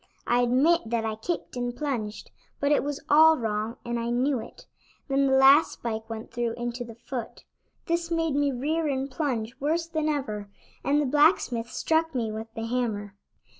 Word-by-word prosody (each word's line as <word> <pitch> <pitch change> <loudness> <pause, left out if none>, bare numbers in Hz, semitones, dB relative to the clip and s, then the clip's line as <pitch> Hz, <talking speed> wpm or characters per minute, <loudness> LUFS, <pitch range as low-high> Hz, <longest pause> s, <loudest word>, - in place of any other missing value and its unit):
I 240 - +2
admit 265 +8 +3
that 230 -1 0
I 220 - -1
kicked 315 +9 -4
and 245 0 -3
plunged, 235 -8 -4 0.3
but 285 +1 +1
it 295 - +3
was 290 0 -4
all 315 +2 +7
wrong, 220 0 -2
and 235 0 -2
I 230 0 -2
knew 255 +2 +1
it; - - -11 0.4
then 275 0 +2
the 265 0 +4
last 275 +4 +6
spike 225 -1 -5
went 225 0 -7
through 235 -1 -1
into 240 +1 -4
the 230 -2 -10
foot. 240 0 -7 0.4
This 335 0 -1
made 330 -2 0
me 285 0 +2
rear 305 +6 -1
and 270 -1 -2
plunge 255 -6 -2
worse 320 +4 0
than 315 -2 -1
ever, 215 -9 -3 0.3
and 290 +1 +2
the 295 - +1
blacksmith 265 -5 +3
struck 320 +1 0
me 230 -3 -1
with 220 +1 -6
the 225 -1 -3
hammer. 225 -4 -2
255 Hz, 185 wpm, -27 LUFS, 230-295 Hz, 0.4 s, all